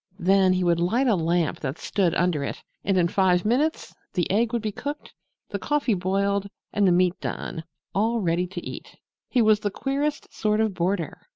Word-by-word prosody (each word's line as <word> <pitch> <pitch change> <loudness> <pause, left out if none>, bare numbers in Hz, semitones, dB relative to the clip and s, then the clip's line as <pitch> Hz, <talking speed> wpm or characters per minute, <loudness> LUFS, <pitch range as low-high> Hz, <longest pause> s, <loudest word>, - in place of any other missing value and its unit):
Then 190 0 +4
he 185 0 0
would 170 -1 +2
light 220 +10 +2
a 240 - +4
lamp 170 -1 0
that 135 +1 -4
stood 185 -5 0
under 170 -5 +1
it, - - -5 0.2
and 195 -2 +1
in 175 -1 +4
five 180 0 +2
minutes 280 +9 0 0.2
the 175 - 0
egg 225 +3 +2
would 235 -2 -1
be 215 - -1
cooked, 290 +8 -6 0.4
the - - -3
coffee 295 -6 +1
boiled 200 +2 0 0.2
and 205 -2 +3
the - - +5
meat 180 0 +2
done 160 - -4 0.3
all 225 +4 +1
ready 175 -2 0
to 180 -1 -7
eat. - - -9 0.3
He 245 -3 +3
was 215 -1 +5
the 205 - -1
queerest 280 +7 -2
sort 210 0 0
of 220 -2 +1
boarder! 180 -1 -2
195 Hz, 195 wpm, -25 LUFS, 175-220 Hz, 0.4 s, the